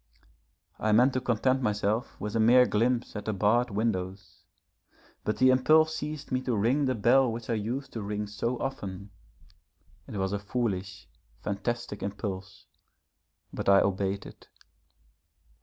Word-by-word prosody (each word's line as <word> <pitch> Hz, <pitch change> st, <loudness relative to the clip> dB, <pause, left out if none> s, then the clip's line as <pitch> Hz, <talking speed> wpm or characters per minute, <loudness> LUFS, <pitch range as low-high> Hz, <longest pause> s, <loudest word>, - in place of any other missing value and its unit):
I 110 Hz, 0 st, +1 dB
meant 125 Hz, +5 st, +5 dB
to 130 Hz, -, -1 dB
content 130 Hz, +2 st, +1 dB
myself 105 Hz, +1 st, -1 dB
with 105 Hz, +3 st, -4 dB
a -, -, +2 dB
mere 125 Hz, +3 st, +6 dB
glimpse 120 Hz, +2 st, 0 dB
at 105 Hz, -, -5 dB
the 110 Hz, -, -1 dB
barred 110 Hz, +5 st, +2 dB
windows, 95 Hz, -4 st, -3 dB, 0.8 s
but 105 Hz, -, -1 dB
the 130 Hz, 0 st, +5 dB
impulse 155 Hz, +5 st, +4 dB
seized 150 Hz, -1 st, -6 dB
me 130 Hz, 0 st, 0 dB
to 125 Hz, -2 st, -1 dB
ring 125 Hz, +8 st, +2 dB
the 130 Hz, -1 st, 0 dB
bell 120 Hz, +4 st, +4 dB
which 115 Hz, +1 st, -5 dB
I -, -, +2 dB
used 115 Hz, +6 st, -3 dB
to 115 Hz, -, -4 dB
ring 105 Hz, +1 st, -3 dB
so 110 Hz, +4 st, -3 dB
often. 100 Hz, -7 st, -5 dB, 1.0 s
It -, -, -6 dB
was 95 Hz, 0 st, -1 dB
a 100 Hz, -, -1 dB
foolish, 100 Hz, -4 st, -3 dB, 0.4 s
fantastic 105 Hz, +1 st, -3 dB
impulse, 95 Hz, -2 st, -5 dB, 0.9 s
but -, -, -1 dB
I 100 Hz, 0 st, +7 dB
obeyed 100 Hz, 0 st, -1 dB
it. -, -, -14 dB
110 Hz, 150 wpm, -28 LUFS, 100-125 Hz, 1.0 s, I